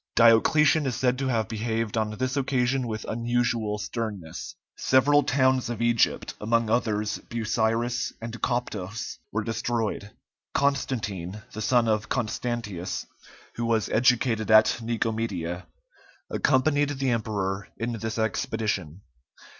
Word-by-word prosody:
Diocletian 140 Hz, +6 st, +5 dB
is 125 Hz, -, -1 dB
said 125 Hz, 0 st, +1 dB
to 135 Hz, -, -1 dB
have 115 Hz, -5 st, 0 dB
behaved 115 Hz, 0 st, -2 dB
on 110 Hz, -1 st, +1 dB
this 130 Hz, +2 st, -1 dB
occasion 130 Hz, -2 st, +1 dB
with 110 Hz, -1 st, -4 dB
unusual 115 Hz, -2 st, 0 dB
sternness. 105 Hz, -7 st, -5 dB, 0.2 s
Several 145 Hz, +3 st, +4 dB
towns 130 Hz, -3 st, +2 dB
of 120 Hz, -2 st, -4 dB
Egypt, 115 Hz, 0 st, +2 dB
among 115 Hz, +1 st, +1 dB
others 110 Hz, -2 st, 0 dB
Busiris 115 Hz, +1 st, 0 dB
and 115 Hz, 0 st, -7 dB
Coptos, 115 Hz, -4 st, -3 dB
were 110 Hz, +1 st, -1 dB
destroyed. 115 Hz, -2 st, -2 dB, 0.5 s
Constantine, 105 Hz, -9 st, -1 dB
the 110 Hz, -, -5 dB
son 120 Hz, +1 st, +3 dB
of 110 Hz, -1 st, 0 dB
Constantius, 115 Hz, -6 st, -3 dB, 0.5 s
who 120 Hz, -, -1 dB
was 115 Hz, -2 st, +1 dB
educated 120 Hz, -2 st, +2 dB
at 110 Hz, +2 st, +6 dB
Nicomedia, 110 Hz, -7 st, -2 dB, 0.6 s
accompanied 145 Hz, +1 st, +2 dB
the 135 Hz, -1 st, +1 dB
emperor 100 Hz, -4 st, -2 dB
in 115 Hz, +1 st, -2 dB
this 110 Hz, 0 st, -4 dB
expedition. 110 Hz, -, -2 dB
115 Hz, 120 wpm, -26 LUFS, 110-125 Hz, 0.6 s, at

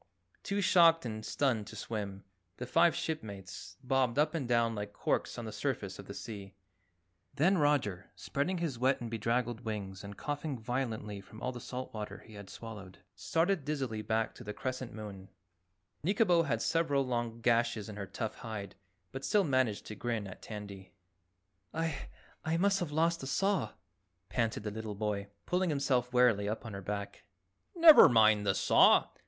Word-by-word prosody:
Too 200 Hz, 0 st, -1 dB
shocked 165 Hz, -5 st, +5 dB
and 110 Hz, -2 st, -4 dB
stunned 115 Hz, -5 st, 0 dB
to -, -, -9 dB
swim, 100 Hz, -3 st, -5 dB, 0.3 s
the 125 Hz, -, -4 dB
five 165 Hz, +6 st, +4 dB
shipmates 100 Hz, -, -5 dB
bobbed 130 Hz, -1 st, +1 dB
up 150 Hz, +1 st, +3 dB
and 150 Hz, -7 st, -2 dB
down 115 Hz, -1 st, +2 dB
like 105 Hz, -1 st, -5 dB
corks -, -, -1 dB
on -, -, -5 dB
the -, -, -5 dB
surface -, -, -3 dB
of -, -, -9 dB
the -, -, -7 dB
sea. 100 Hz, -3 st, -8 dB, 0.8 s
Then 180 Hz, +5 st, +3 dB
Roger, 125 Hz, -, +1 dB
spreading 170 Hz, +7 st, -2 dB
his 160 Hz, -8 st, -3 dB
wet 130 Hz, +2 st, +2 dB
and 115 Hz, -2 st, -6 dB
bedraggled 115 Hz, +1 st, -1 dB
wings 100 Hz, -3 st, -5 dB
and 100 Hz, -1 st, -8 dB
coughing 145 Hz, -1 st, -3 dB
violently 110 Hz, -4 st, -3 dB
from 110 Hz, +2 st, -13 dB
all -, -, -2 dB
the 125 Hz, -, -7 dB
salt 130 Hz, +2 st, -6 dB
water 105 Hz, -1 st, -5 dB
he 110 Hz, -, -15 dB
had 100 Hz, -1 st, -10 dB
swallowed, 105 Hz, -5 st, -9 dB, 0.2 s
started 165 Hz, 0 st, 0 dB
dizzily 130 Hz, -7 st, -2 dB
back 110 Hz, +1 st, 0 dB
to -, -, -11 dB
the 105 Hz, -2 st, -6 dB
Crescent 130 Hz, -1 st, -4 dB
Moon. 100 Hz, -3 st, -8 dB, 0.7 s
Nikobo 180 Hz, -3 st, +3 dB
had 115 Hz, -4 st, 0 dB
several 145 Hz, -5 st, +1 dB
long 120 Hz, -2 st, -2 dB
gashes 115 Hz, -3 st, +1 dB
in 105 Hz, -, -7 dB
her 100 Hz, -2 st, -5 dB
tough 110 Hz, +3 st, -4 dB
hide, 105 Hz, -4 st, -6 dB, 0.4 s
but 135 Hz, +1 st, -6 dB
still 210 Hz, +4 st, +3 dB
managed 130 Hz, -, +1 dB
to -, -, -6 dB
grin 115 Hz, -3 st, -2 dB
at 95 Hz, -, -10 dB
Tandy. 100 Hz, -3 st, -8 dB, 0.8 s
"I 165 Hz, -3 st, -2 dB, 0.4 s
I 160 Hz, +1 st, 0 dB
must 195 Hz, +2 st, +3 dB
have 170 Hz, -4 st, -3 dB
lost 165 Hz, +2 st, +2 dB
the 135 Hz, -, -6 dB
saw," 185 Hz, -, 0 dB, 0.6 s
panted 115 Hz, -3 st, -1 dB
the 105 Hz, -, -3 dB
little 110 Hz, -1 st, -5 dB
boy, 100 Hz, -1 st, -2 dB, 0.2 s
pulling 180 Hz, 0 st, +1 dB
himself 130 Hz, -4 st, +1 dB
wearily 120 Hz, -5 st, +4 dB
up 110 Hz, +3 st, -4 dB
on 110 Hz, -, -6 dB
her 100 Hz, -, -6 dB
back. 100 Hz, +1 st, -5 dB, 0.5 s
"Never 330 Hz, -3 st, +10 dB
mind 110 Hz, -3 st, +5 dB
the 95 Hz, -, +3 dB
saw. -, -, +5 dB
120 Hz, 175 wpm, -32 LUFS, 105-145 Hz, 0.8 s, Never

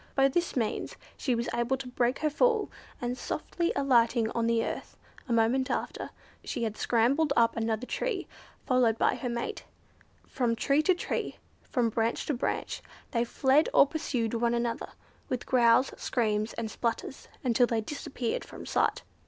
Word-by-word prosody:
By 270 Hz, 0 st, +5 dB
this 345 Hz, +5 st, -1 dB
means 230 Hz, -5 st, -1 dB, 0.2 s
she 255 Hz, -4 st, 0 dB
was 235 Hz, +1 st, -2 dB
able 240 Hz, +3 st, +1 dB
to 265 Hz, -1 st, -7 dB
break 250 Hz, +1 st, +1 dB
her -, -, +4 dB
fall, 445 Hz, +5 st, +2 dB, 0.3 s
and 245 Hz, -2 st, -2 dB
softly 340 Hz, +6 st, -2 dB
alighting 235 Hz, -4 st, +3 dB
on 230 Hz, -1 st, 0 dB
the 230 Hz, -1 st, +2 dB
earth, -, -, -6 dB, 0.3 s
a -, -, -2 dB
moment 235 Hz, +4 st, +2 dB
after, -, -, -3 dB, 0.3 s
she 245 Hz, -, -3 dB
had 220 Hz, -2 st, -2 dB
scrambled 265 Hz, +8 st, +2 dB
up 230 Hz, -3 st, +4 dB
another 225 Hz, +1 st, -1 dB
tree, 425 Hz, -, -2 dB, 0.4 s
followed 245 Hz, -3 st, +3 dB
by -, -, +3 dB
her 250 Hz, -, -3 dB
mate. 235 Hz, 0 st, -3 dB, 0.6 s
From 240 Hz, -3 st, 0 dB
tree 275 Hz, +5 st, +2 dB
to 365 Hz, +4 st, +3 dB
tree, -, -, -3 dB, 0.3 s
from 245 Hz, -4 st, 0 dB
branch 225 Hz, +1 st, 0 dB
to 300 Hz, -, 0 dB
branch, 250 Hz, -, -2 dB, 0.3 s
they 235 Hz, -3 st, +2 dB
fled 265 Hz, +5 st, +3 dB
or -, -, +8 dB
pursued 265 Hz, -7 st, -2 dB
one 235 Hz, 0 st, +1 dB
another, 235 Hz, -1 st, -2 dB, 0.4 s
with 250 Hz, -, -2 dB
growls, 240 Hz, 0 st, +4 dB
screams, 215 Hz, -3 st, 0 dB
and 220 Hz, -2 st, -4 dB
splutters, 235 Hz, +3 st, -3 dB, 0.2 s
until 245 Hz, -1 st, +3 dB
they 230 Hz, -2 st, 0 dB
disappeared 250 Hz, -1 st, -3 dB
from -, -, -10 dB
sight. -, -, +1 dB
240 Hz, 165 wpm, -29 LUFS, 230-270 Hz, 0.6 s, or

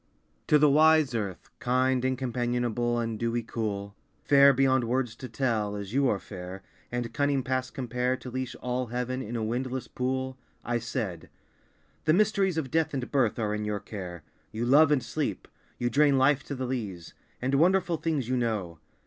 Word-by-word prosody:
To 150 Hz, -, +6 dB
the 150 Hz, 0 st, +5 dB
wise 155 Hz, -1 st, +5 dB
earth, 100 Hz, -5 st, -4 dB
Kind, 130 Hz, +1 st, +1 dB
and 130 Hz, 0 st, +1 dB
companionable, 120 Hz, -1 st, -1 dB
and 115 Hz, -2 st, -2 dB
dewy 115 Hz, 0 st, -1 dB
cool, 100 Hz, -3 st, -4 dB, 0.3 s
Fair 140 Hz, -1 st, +7 dB
beyond 130 Hz, -1 st, +3 dB
words 120 Hz, -1 st, -1 dB
to 130 Hz, -, -8 dB
tell, 110 Hz, -4 st, -1 dB
as 100 Hz, +1 st, -6 dB
you 135 Hz, -1 st, +3 dB
are 100 Hz, -, +1 dB
fair, 95 Hz, -1 st, -8 dB, 0.3 s
And 120 Hz, -1 st, -3 dB
cunning 145 Hz, -2 st, +1 dB
past 130 Hz, 0 st, -2 dB
compare 125 Hz, -1 st, -1 dB
To 125 Hz, 0 st, -9 dB
leash 130 Hz, 0 st, -4 dB
all 125 Hz, 0 st, -1 dB
heaven 125 Hz, +2 st, -3 dB
in 120 Hz, 0 st, -5 dB
a 115 Hz, -, -1 dB
windless 125 Hz, +3 st, -2 dB
pool, 130 Hz, +1 st, -3 dB, 0.3 s
I 120 Hz, 0 st, 0 dB
said 110 Hz, -, -4 dB, 0.8 s
"The 155 Hz, -, +4 dB
mysteries 195 Hz, -2 st, +2 dB
of 135 Hz, -6 st, -2 dB
death 160 Hz, -2 st, +1 dB
and 130 Hz, -2 st, -4 dB
birth 130 Hz, -6 st, +2 dB
Are 105 Hz, -2 st, -1 dB
in 105 Hz, 0 st, -2 dB
your 105 Hz, -1 st, -2 dB
care. 90 Hz, -6 st, -7 dB, 0.3 s
You 110 Hz, +2 st, -2 dB
love, 145 Hz, +4 st, +6 dB
and 135 Hz, -5 st, +3 dB
sleep; -, -, -3 dB, 0.3 s
you 120 Hz, -, -1 dB
drain 140 Hz, +2 st, +4 dB
life 135 Hz, +2 st, +3 dB
to 140 Hz, -, -4 dB
the 130 Hz, 0 st, -3 dB
lees; 105 Hz, -10 st, -5 dB, 0.3 s
And 130 Hz, +2 st, -1 dB
wonderful 175 Hz, +3 st, +3 dB
things 150 Hz, -7 st, -1 dB
you 130 Hz, 0 st, 0 dB
know. 105 Hz, -9 st, -2 dB
125 Hz, 185 wpm, -28 LUFS, 115-135 Hz, 0.8 s, Fair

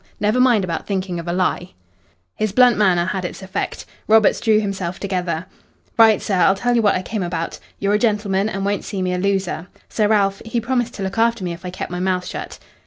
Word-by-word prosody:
Never 210 Hz, +4 st, +1 dB
mind 245 Hz, -5 st, +4 dB
about 170 Hz, -3 st, -4 dB
thinking 185 Hz, -3 st, -2 dB
of 170 Hz, -, -7 dB
a -, -, 0 dB
lie." 180 Hz, 0 st, -1 dB, 0.6 s
His 215 Hz, -2 st, -2 dB
blunt 245 Hz, +2 st, +5 dB
manner 185 Hz, -4 st, +3 dB
had 185 Hz, 0 st, -2 dB
its 180 Hz, +2 st, -6 dB
effect. 190 Hz, 0 st, -4 dB, 0.2 s
Roberts 220 Hz, -1 st, +4 dB
drew 220 Hz, -2 st, +3 dB
himself 195 Hz, -3 st, -3 dB
together. 180 Hz, -4 st, -2 dB, 0.5 s
"Right, 220 Hz, -2 st, +6 dB
sir, 195 Hz, -, -1 dB
I'll 180 Hz, +2 st, +4 dB
tell 245 Hz, +4 st, 0 dB
you 235 Hz, -, +3 dB
what 205 Hz, -2 st, +3 dB
I 185 Hz, -, -2 dB
came 215 Hz, +2 st, -3 dB
about. 170 Hz, -2 st, -3 dB, 0.2 s
You're 200 Hz, +1 st, 0 dB
a 210 Hz, -, +3 dB
gentleman 210 Hz, -3 st, +1 dB
and 195 Hz, -1 st, -3 dB
won't 200 Hz, 0 st, -1 dB
see 195 Hz, -3 st, -4 dB
me 180 Hz, 0 st, -1 dB
a 180 Hz, -, -1 dB
loser. 190 Hz, -3 st, -1 dB, 0.2 s
Sir 215 Hz, -2 st, +1 dB
Ralph, 200 Hz, -2 st, +2 dB
he 225 Hz, +1 st, -2 dB
promised 240 Hz, 0 st, -1 dB
to 200 Hz, -, -5 dB
look 195 Hz, +3 st, -3 dB
after 230 Hz, -3 st, +2 dB
me 175 Hz, -1 st, -2 dB
if 170 Hz, -, -11 dB
I 180 Hz, -, -4 dB
kept 180 Hz, -, -6 dB
my 180 Hz, -, -3 dB
mouth 180 Hz, 0 st, 0 dB
shut." -, -, -6 dB
195 Hz, 230 wpm, -20 LUFS, 180-215 Hz, 0.6 s, Right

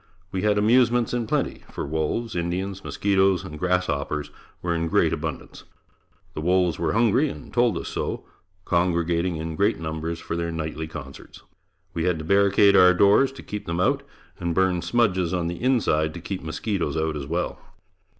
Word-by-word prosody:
We 95 Hz, -, -2 dB
had 105 Hz, 0 st, +2 dB
amusements 120 Hz, +2 st, +3 dB
in 120 Hz, -2 st, -1 dB
plenty, -, -, -1 dB
for -, -, -4 dB
wolves, 80 Hz, +10 st, -2 dB
Indians, 90 Hz, +3 st, -3 dB
mosquitoes 95 Hz, -2 st, +1 dB
and 75 Hz, 0 st, -8 dB
grasshoppers 75 Hz, -5 st, -1 dB, 0.3 s
were 85 Hz, -1 st, 0 dB
in 85 Hz, 0 st, -1 dB
great 80 Hz, 0 st, +2 dB
abundance. 80 Hz, -1 st, -5 dB, 0.7 s
The -, -, -5 dB
wolves 90 Hz, -1 st, +2 dB
were 85 Hz, -, 0 dB
hungry 120 Hz, +6 st, +3 dB
and -, -, -10 dB
told 120 Hz, -1 st, +2 dB
us -, -, -5 dB
so, -, -, -4 dB, 0.4 s
congregating 85 Hz, 0 st, +1 dB
in 80 Hz, 0 st, -4 dB
great 100 Hz, +4 st, +1 dB
numbers 80 Hz, +1 st, -4 dB
for 85 Hz, -, -5 dB
their 85 Hz, 0 st, -2 dB
nightly 80 Hz, -1 st, -4 dB
concerts. 70 Hz, -3 st, -10 dB, 0.5 s
We 85 Hz, -, -1 dB
had 90 Hz, -2 st, +1 dB
to 80 Hz, -, -6 dB
barricade 100 Hz, +2 st, +4 dB
our 90 Hz, -1 st, +7 dB
doors 100 Hz, +9 st, +5 dB
to 135 Hz, -, -11 dB
keep 105 Hz, 0 st, -6 dB
them 85 Hz, +1 st, -2 dB
out 90 Hz, -, +2 dB, 0.4 s
and 85 Hz, -1 st, -2 dB
burn 95 Hz, -1 st, +2 dB
smudges 95 Hz, -7 st, +1 dB
on 90 Hz, -2 st, -1 dB
the 85 Hz, +1 st, -4 dB
inside 90 Hz, -12 st, +1 dB
to -, -, -6 dB
keep 90 Hz, +2 st, -5 dB
mosquitoes 80 Hz, 0 st, -2 dB
out 80 Hz, -1 st, -1 dB
as 70 Hz, -2 st, -5 dB
well. 85 Hz, +3 st, -2 dB
90 Hz, 175 wpm, -24 LUFS, 80-100 Hz, 0.7 s, our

